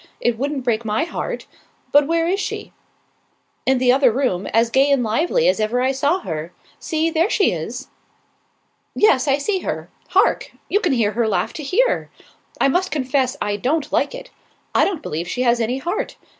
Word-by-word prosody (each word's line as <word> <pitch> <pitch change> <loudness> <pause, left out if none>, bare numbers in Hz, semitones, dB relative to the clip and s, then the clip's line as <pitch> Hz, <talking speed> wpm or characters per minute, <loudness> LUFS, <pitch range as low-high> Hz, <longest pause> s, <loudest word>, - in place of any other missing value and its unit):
It 240 - +1
wouldn't 275 +2 -3
break 235 -2 0
my 215 +3 0
heart. 340 - -4 0.5
But 290 0 +5
where 330 0 +1
is 385 +3 0
she?" - - -5 0.9
"In 265 0 +4
the 250 0 +4
other 260 -1 +4
room, 220 -7 -1
as 230 +1 +2
gay 270 +3 +4
and 275 -3 +3
lively 340 - +1
as - - +2
ever 220 +3 0
I 260 +1 +2
saw 285 +7 +1
her. 160 0 -5 0.3
See, 320 0 -1
there 330 +5 +2
she 405 - +3
is." 225 +11 -5 1.1
"Yes, 280 -10 +4
I 275 0 +3
see 380 +7 -1
her. - - -5 0.2
Hark! - - +2 0.2
You 410 - +3
can 430 - +1
hear 225 -5 +2
her 230 +1 0
laugh 185 -4 -1
to - - -6
here. 390 - +1 0.5
I - - +4
must 360 +7 +1
confess 260 -2 0
I 205 0 -1
don't 280 +8 -1
like - - 0
it. - - -10 0.4
I - - +4
don't 380 -6 -3
believe 165 +3 -4
she 250 - -1
has 240 -1 +3
any 235 +3 0
heart. 345 +9 -3
265 Hz, 190 wpm, -20 LUFS, 230-325 Hz, 1.1 s, But